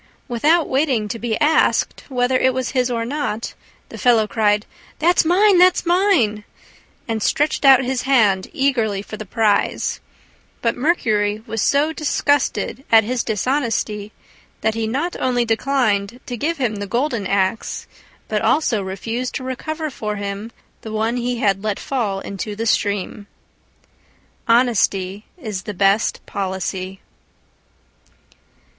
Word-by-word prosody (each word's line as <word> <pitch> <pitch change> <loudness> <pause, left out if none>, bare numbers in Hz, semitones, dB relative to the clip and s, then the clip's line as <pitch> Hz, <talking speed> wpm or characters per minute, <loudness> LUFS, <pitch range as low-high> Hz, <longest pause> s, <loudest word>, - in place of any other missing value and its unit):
Without 300 +7 +2
waiting 260 -6 +1
to 230 - -4
be 225 -1 -1
asked 315 +2 +2
whether 250 0 +1
it 260 0 +2
was 260 -1 -2
his 255 -2 +1
or 230 -2 -1
not 240 -4 -3 0.4
the - - -9
fellow 235 -4 +4
cried, 210 0 +1 0.3
"That's 350 +3 +3
mine, 370 +3 +4
that's 365 0 +4
mine," 345 - +2 0.6
and 225 -1 -2
stretched 295 +5 +1
out 270 -1 +7
his 255 -1 -1
hand 215 -8 +3
eagerly 230 -8 0
for 215 - -8
the 215 -1 -8
prize: 210 -1 +1 0.6
but 230 - 0
Mercury 220 -8 0
was 225 -2 -3
so 290 +7 +2
disgusted 285 -4 0
at 225 -1 +7
his 245 +3 -1
dishonesty 220 -2 -1 0.5
that 220 - +1
he 225 0 -2
not 290 +10 -2
only 245 -2 +1
declined 225 -2 0
to 245 - -4
give 320 +8 -2
him 235 -6 -1
the 200 0 -5
golden 235 -2 -1
axe, 195 +2 -1 0.4
but 210 -1 -1
also 235 -2 +2
refused 225 +6 -4
to - - -3
recover 310 +4 -4
for 215 -4 -4
him 200 +2 -5 0.3
the 220 - -8
one 220 +3 -1
he 245 0 -1
had 200 -3 +1
let 215 -2 -1
fall 220 -8 -2
into 205 +2 -5
the 225 +2 -3
stream. 205 -1 -1 1.2
Honesty 210 -5 +2
is 215 - -5
the 205 +1 -7
best 195 +3 +1
policy. 190 -1 -4
230 Hz, 140 wpm, -20 LUFS, 210-265 Hz, 1.2 s, out